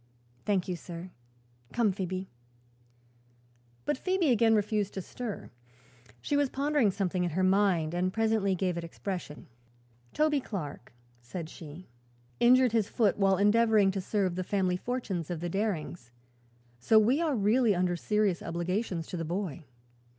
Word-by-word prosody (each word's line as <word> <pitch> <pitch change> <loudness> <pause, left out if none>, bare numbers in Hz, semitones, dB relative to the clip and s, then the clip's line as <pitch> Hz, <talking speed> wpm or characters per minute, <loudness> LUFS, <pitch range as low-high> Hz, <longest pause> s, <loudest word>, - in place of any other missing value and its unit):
"Thank 195 -4 +1
you, 180 - -2
sir. 170 +2 -8 0.6
Come, 230 -4 +2
Phoebe." 185 0 -4 1.6
But - - -1
Phoebe 370 -6 +1
again 225 -1 +4
refused 210 -1 0
to 190 - -3
stir. 235 0 -6 0.7
She 290 - 0
was 285 -2 +2
pondering 280 -4 +2
something 185 -2 -1
in 175 - 0
her 185 +4 -1
mind 185 -4 +2
and 180 +1 0
presently 220 -3 +1
gave 180 -1 -1
it - - -6
expression. 170 -2 -6 0.7
"Toby 305 -1 +2
Clark," 150 - -6 0.3
said 160 +7 -7
she, 160 +3 -11 0.5
"injured 250 0 +5
his 220 -2 +1
foot 215 -4 +1
while 195 -1 +4
endeavoring 210 0 +4
to 190 0 -3
serve 190 -1 0
the 185 +1 -3
family 185 -1 0
fortunes 195 -6 -3
of 175 -3 -3
the 175 +1 -3
Darings, 175 - -3 0.7
so 220 - +4
we 240 +8 +4
are 315 -5 +1
really 220 +1 +3
under 180 0 +1
serious 205 0 0
obligations 175 +1 -2
to 180 - -6
the 165 - -3
boy. 170 -2 -4
195 Hz, 150 wpm, -29 LUFS, 175-225 Hz, 1.6 s, injured